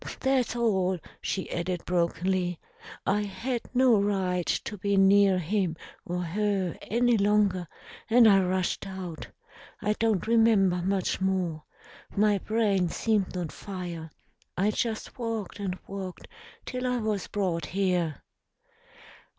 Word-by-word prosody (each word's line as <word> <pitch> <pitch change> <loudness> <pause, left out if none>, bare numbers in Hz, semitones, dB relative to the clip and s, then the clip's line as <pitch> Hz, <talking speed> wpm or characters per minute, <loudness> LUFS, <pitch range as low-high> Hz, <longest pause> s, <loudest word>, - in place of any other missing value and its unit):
"That's 265 -3 +1
all," 190 -6 +1 0.2
she 190 - -2
added 175 0 -2
brokenly. 180 0 0 0.5
"I 205 +2 +2
had 235 +4 -3
no 250 -5 +4
right 185 -3 0
to 210 - -1
be 200 0 0
near 195 0 +5
him 180 0 0 0.3
or 180 +1 -2
her 195 0 -1
any 240 +1 +2
longer, 200 -3 +2 0.4
and 230 0 +7
I 195 -2 +7
rushed 185 +1 -1
out. 185 -4 -6 0.5
I 210 0 +1
don't 220 -3 0
remember 220 -5 +4
much 190 +1 -1
more. 180 -5 -1 0.5
My 205 -1 +3
brain 200 -4 +1
seemed 205 -1 0
on 175 -3 -3
fire. 175 -4 -6 0.5
I 200 +3 +2
just 225 +2 -3
walked 225 -4 -3
and 190 -2 -3
walked 190 -2 -7 0.4
till 255 0 -3
I 250 0 +1
was 215 -4 -2
brought 180 -5 -1
here." 180 -6 0
195 Hz, 125 wpm, -28 LUFS, 180-215 Hz, 0.5 s, and